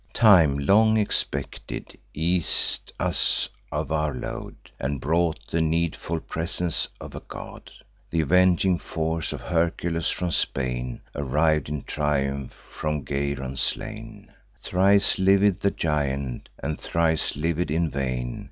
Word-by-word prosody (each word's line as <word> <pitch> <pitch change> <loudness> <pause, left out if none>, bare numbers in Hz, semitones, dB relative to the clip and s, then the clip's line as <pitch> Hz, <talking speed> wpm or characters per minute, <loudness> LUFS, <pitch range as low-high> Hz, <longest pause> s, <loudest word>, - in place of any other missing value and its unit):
Time, 90 -11 +6
long 110 +10 +4
expected, 105 -1 -2 0.2
eas'd 85 +2 +1
us - - +2 0.2
of - - -3
our 75 -2 0
load, - - -6 0.2
And 70 +2 -2
brought 80 +3 0
the 85 - -1
needful 80 0 0
presence 85 +1 -2
of - - -9
a - - -5
god. - - -9 0.4
Th' 80 - +2
avenging 90 +2 +3
force 80 0 -2
of - - -6
Hercules, 85 -1 0
from 90 -1 -2
Spain, 65 -4 -1
Arriv'd 75 +1 +1
in 75 -1 -4
triumph, 70 -2 -1 0.2
from 75 -3 -3
Geryon 70 -2 -2
slain: 110 +2 -3 0.3
Thrice 100 +2 +3
liv'd 95 0 +4
the 100 - +3
giant, 70 -7 -2
and 75 +1 -4
thrice 80 -1 +1
liv'd 85 +3 -1
in 80 +1 0
vain. 65 -3 -2
80 Hz, 125 wpm, -25 LUFS, 70-90 Hz, 0.4 s, Time